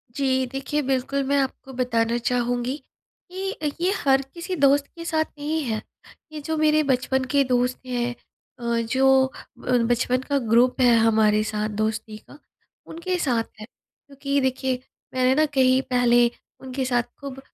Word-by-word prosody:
जी। 260 -2 +1
देखिए, 270 +3 -2
बिल्कुल 270 +1 -1
मैं 280 +1 +2
आपको 265 0 -5
बताना 235 -2 0
चाहूँगी 245 +1 -1 0.6
कि 385 +1 -4 0.3
ये 365 - +2
हर 270 -1 +3
किसी 350 +2 -4
दोस्त 280 -2 +3
के 335 -1 -8
साथ 315 -2 +1
नहीं 310 +2 -2
है। 220 -4 -2 0.5
ये 310 - -6
जो 320 +2 -3
मेरे 310 0 +3
बचपन 265 -1 +1
के 280 -1 +4
दोस्त 250 0 0
हैं 245 -1 -2 0.4
अ, - - -10 0.2
जो 265 +2 +3 0.3
ब 250 0 +1
बचपन 250 +1 +1
का 280 +2 -1
ग्रुप 245 +4 +4
है 245 -2 +6
हमारे 215 -1 +3
साथ 215 -1 -2
दोस्ती 215 +1 -3
का 285 - -16 0.5
उनके 360 +3 -3
साथ 245 -8 +1 0.2
है। 215 - -7
क्योंकि 280 +3 -5
देखिए 260 0 0 0.4
मैंने 255 0 +3
न - - +5
कहीं 260 -1 +4
पहले 240 -2 +3 0.3
उनके 260 0 -4
साथ 245 -1 +1 0.2
खूब 275 -2 -7
260 Hz, 155 wpm, -24 LUFS, 240-280 Hz, 0.6 s, है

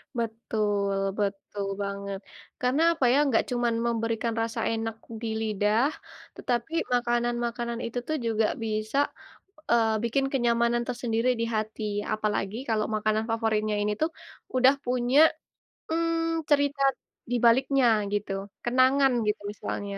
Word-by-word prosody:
Betul 215 -3 -1 0.2
betul 200 0 -2 0.2
banget. 200 0 -4 0.4
Karena, 255 +5 +2
apa 295 -6 0
ya, - - +4
enggak 255 -6 +3
cuman 240 -1 +1
memberikan 230 0 -1
rasa 225 0 -2
enak 225 0 -2 0.3
di 230 - -3
lidah, 215 +4 +2 0.5
tetapi 240 +6 -2 0.2
makanan-makanan 240 -1 0
itu 235 +1 -3
tuh 310 - 0
juga 225 -1 +2 0.2
bisa, 215 +3 -2 0.7
eee, 225 -2 +3
bikin 270 +4 +1
kenyamanan 235 -1 +2
tersendiri 240 -1 0
di - - +1
hati. 215 +1 -3 0.3
Apalagi 215 -1 -1
kalau 215 -1 +1
makanan 215 +1 0
favoritnya 215 -2 0
ini 210 0 +1
tuh 315 - +2 0.5
udah 255 +1 +6
punya, 250 +2 +2 0.7
mmm, 330 -1 0
cerita 285 -1 +2 0.5
dibaliknya 250 +2 +4 0.3
gitu, 205 -1 -1 0.3
kenangan 260 +2 +4 0.2
gitu 210 0 0
misalnya, 200 -1 -5
230 Hz, 120 wpm, -27 LUFS, 215-250 Hz, 0.7 s, udah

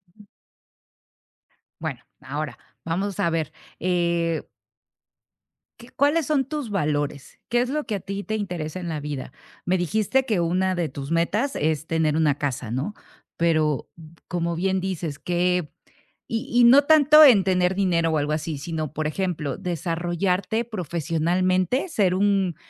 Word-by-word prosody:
Ujú. 210 - -17 1.6
Bueno, - - -4 0.2
ahora, 145 +2 -5 0.3
vamos 190 +4 -2
a 170 - +2
ver, 165 -3 -2 0.3
eh 170 -2 0 1.4
¿qué 235 +1 -13
cuáles 290 +4 +2
son 285 -3 +2
tus 290 -3 -4
valores? 145 -7 -2
¿Qué 240 0 +2
es 250 - -1
lo 300 +2 -2
que 215 - -2
a - - -3
ti 200 +2 -5
te 220 - -3
interesa 180 -5 -4
en 175 -2 -5
la 155 -2 -3
vida? 145 -3 -5 0.3
Me 185 +1 +2
dijiste 215 +9 +1
que 215 -7 0
una 185 +2 +1
de 170 -3 -1
tus 140 +2 -7
metas 205 +11 0
es 155 0 -1
tener 160 -2 +1
una 155 -3 +3
casa, 125 -5 -3
¿no?, 135 - -2 0.4
pero 155 -4 +1 0.4
como 170 -1 -2
bien 190 +2 0
dices 175 -5 -4
que 180 -2 0 0.6
y 225 0 -3
y 245 0 +5
no 270 +4 +8
tanto 305 0 +7
en 220 -9 +7
tener 180 -1 +2
dinero 170 -4 +1
o 160 - +1
algo 145 +1 -1
así, 155 0 -2
sino, 155 -1 -4
por 155 -1 -2
ejemplo, 155 -5 -2
desarrollarte 180 +5 -1
profesionalmente, 180 - 0
ser 195 - +2
un 195 -3 +2
175 Hz, 150 wpm, -24 LUFS, 160-205 Hz, 1.6 s, no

